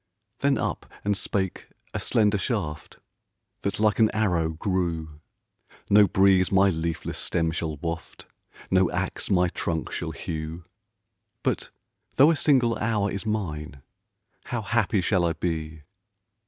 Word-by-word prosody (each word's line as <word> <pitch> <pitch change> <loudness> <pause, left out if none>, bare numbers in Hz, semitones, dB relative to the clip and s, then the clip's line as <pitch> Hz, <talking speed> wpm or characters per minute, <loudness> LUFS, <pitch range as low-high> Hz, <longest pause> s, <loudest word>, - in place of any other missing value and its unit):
Then 140 0 +2
up - - -3 0.2
and 105 0 +2
spake 95 -1 -2 0.3
a - - -2
slender 105 -2 +2
shaft, 85 - -3 0.6
That 100 - -2
like 105 0 +2
an 110 -1 +6
arrow 90 -7 +1
grew; 80 -3 -2 0.7
"No 105 0 +7
breeze 95 0 +4
my 95 0 +5
leafless 80 -1 -3
stem 80 -1 0
shall 80 -2 -3
waft, 85 +2 -6 0.5
No 95 -1 +4
ax 90 +1 -3
my 90 -3 +4
trunk 80 -2 -3
shall - - -3
hew 80 +1 -5 0.8
But - - -1 0.5
though 145 +5 +7
a - - +2
single 130 -6 +3
hour 105 -2 0
is 100 +3 -4
mine, 75 -10 -3 0.6
How 120 -2 -3
happy 105 -2 +1
shall 90 0 +2
I 85 -1 +2
be! 80 -2 -4
95 Hz, 135 wpm, -26 LUFS, 80-105 Hz, 0.8 s, No